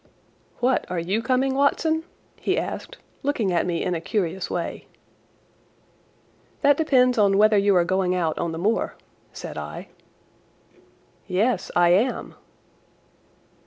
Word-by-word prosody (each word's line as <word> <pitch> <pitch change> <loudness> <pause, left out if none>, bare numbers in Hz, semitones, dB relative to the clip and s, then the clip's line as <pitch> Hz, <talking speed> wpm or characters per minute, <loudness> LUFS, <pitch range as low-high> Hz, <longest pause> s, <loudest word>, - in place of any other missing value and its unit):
"What, 255 +2 +1
are 180 - -3
you 185 +6 -1
coming, 260 +2 +1
Watson?" 315 +4 +1 0.3
he - - -1
asked, - - -4 0.2
looking 240 -10 0
at 170 - +1
me 170 -2 -1
in 180 - -1
a 165 - -3
curious 185 -1 -2
way. - - -4 1.7
"That 285 0 +5
depends 255 -6 +3
on 200 -1 +4
whether 215 +1 +5
you 200 -1 +3
are 175 -1 +4
going 185 0 +1
on 170 0 -1
the 160 - -5
moor," 210 +7 0 0.4
said - - -7
I. - - -8 1.4
"Yes, 205 +3 0
I 175 0 +5
am." 205 +9 +1
200 Hz, 125 wpm, -24 LUFS, 180-255 Hz, 1.7 s, That